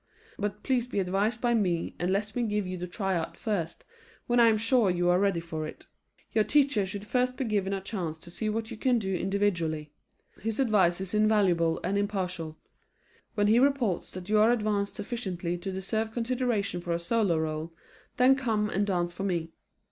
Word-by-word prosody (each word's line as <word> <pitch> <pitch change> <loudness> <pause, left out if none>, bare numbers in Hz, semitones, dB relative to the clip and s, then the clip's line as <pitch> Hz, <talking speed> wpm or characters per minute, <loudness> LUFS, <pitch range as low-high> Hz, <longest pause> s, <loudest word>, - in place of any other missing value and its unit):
But 205 0 -3
please 250 -3 +1
be 245 - -5
advised 195 +5 0
by 240 -1 +2
me 180 -7 0
and 180 +1 0
let 205 +2 -1
me 245 - 0
give 210 -3 0
you 185 0 -4
the 180 0 -5
tryout 185 -3 -2
first 185 -7 -3 0.4
when 240 0 +2
I 235 - +7
am 220 -1 +4
sure 225 -1 +3
you 175 0 +1
are 180 +1 +4
ready 195 -3 +2
for 160 -2 -4
it. - - -11 0.5
Your 215 - +3
teacher 275 -7 +2
should 200 +2 -6
first 250 +2 0
be 265 - -1
given 200 -3 0
a 195 -1 -2
chance 180 -6 -4
to 170 +2 -11
see 215 +4 -2
what 220 +1 -3
you - - -6
can 250 +1 +2
do 195 -4 -2
individually. 175 -6 -1 0.5
His 225 +2 -3
advice 195 -8 +3
is 190 0 -5
invaluable 195 -6 +3
and 200 +3 0
impartial. 185 -6 -3 0.8
When 205 -1 +2
he 220 +3 +5
reports 260 -9 +1
that 185 -1 -7
you 215 0 +3
are 215 +2 +6
advanced 210 -4 0
sufficiently 190 -6 -3
to 195 +2 -4
deserve 220 +4 -2
consideration 235 -6 -1
for 175 -1 -2
a 170 - -1
solo 195 -1 +1
role, 160 +1 -2 0.5
then 255 +2 +6
come 220 -6 0
and 200 +1 +1
dance 175 -3 0
for 195 - -5
me. 170 -4 -1
200 Hz, 195 wpm, -28 LUFS, 175-225 Hz, 0.8 s, I